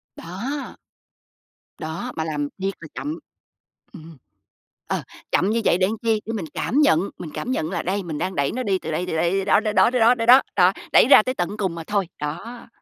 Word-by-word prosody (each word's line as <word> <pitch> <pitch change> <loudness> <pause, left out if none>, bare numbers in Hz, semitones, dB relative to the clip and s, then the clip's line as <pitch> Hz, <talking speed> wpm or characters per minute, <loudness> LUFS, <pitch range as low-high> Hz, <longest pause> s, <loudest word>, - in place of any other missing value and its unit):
Đó. 240 - -6 1.0
Đó, 165 +11 -5
mà 160 - -2
làm 150 -2 -2
thiệt 195 +1 -1
là 160 - -10
chậm, 305 +3 -4 0.7
ừm, 160 -4 -12 0.7
ờ, - - -2 0.3
chậm 190 - +2
như 230 +1 +1
vậy 175 - +3
để 185 - +3
làm 220 +1 -4
chi? 225 -2 +1
Để 225 - -3
mình 195 -8 -4
cảm 270 +7 0
nhận, 275 - +4 0.2
mình 165 - -7
cảm 250 - -4
nhận 160 -9 -2
là 175 -3 -2
đây, 195 +3 -1
mình 160 -4 -5
đang 185 0 -2
đẩy 140 -3 0
nó 255 - -3
đi 195 -4 0
từ - - -6
đây, 175 +4 -2
từ 160 - -3
đây 170 +1 +1
đi 195 0 0
đó, 200 - +4
đó, 215 -1 -2
đó, 230 - +4
đó, 250 - 0
đó, 230 +2 +6
đó, 230 -1 -3
đó, 255 +3 +8
đó, 180 0 +5 0.2
đẩy - - +7
ra 265 - +8
tới 255 +3 -2
tận 175 +1 -3
cùng 190 -5 -1
mà 165 -1 -7
thôi, 200 -2 -1
đó. 225 +12 -6
195 Hz, 235 wpm, -22 LUFS, 165-230 Hz, 1.0 s, đó